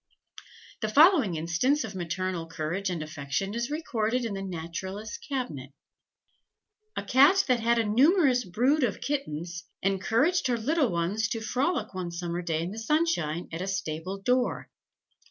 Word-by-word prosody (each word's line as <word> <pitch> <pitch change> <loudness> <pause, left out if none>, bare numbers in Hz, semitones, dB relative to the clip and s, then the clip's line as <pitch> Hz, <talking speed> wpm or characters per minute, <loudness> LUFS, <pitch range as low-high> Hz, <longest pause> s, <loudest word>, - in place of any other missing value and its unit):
The 215 - -2
following 290 - +5
instance 175 - +1
of 215 - -6
maternal 180 -1 -3
courage 165 +4 -3
and 170 -4 -3
affection 155 +6 -3
is 235 +2 -2
recorded 250 -6 -1
in 220 - -3
the 195 - -4
Naturalists' 190 +4 -5
Cabinet: 155 - -5 1.2
"A - - -3
Cat 285 +10 +5
that 250 -2 +3
had 235 +1 +2
a 230 - +3
numerous 260 - +4
brood 255 - +1
of 225 -5 0
kittens, 170 - -3 0.2
encouraged 230 - +2
her 245 -2 +1
little 275 +2 +1
ones 180 +6 0
to 225 - -2
frolic 255 - -1
one 185 -2 -4
summer 170 0 -3
day 165 -2 -1
in 175 - -4
the 220 - -6
sunshine, 225 - 0
at 165 +2 -4
a 190 - -3
stable 190 -1 -3
door. 250 +4 0
210 Hz, 155 wpm, -28 LUFS, 170-255 Hz, 1.2 s, following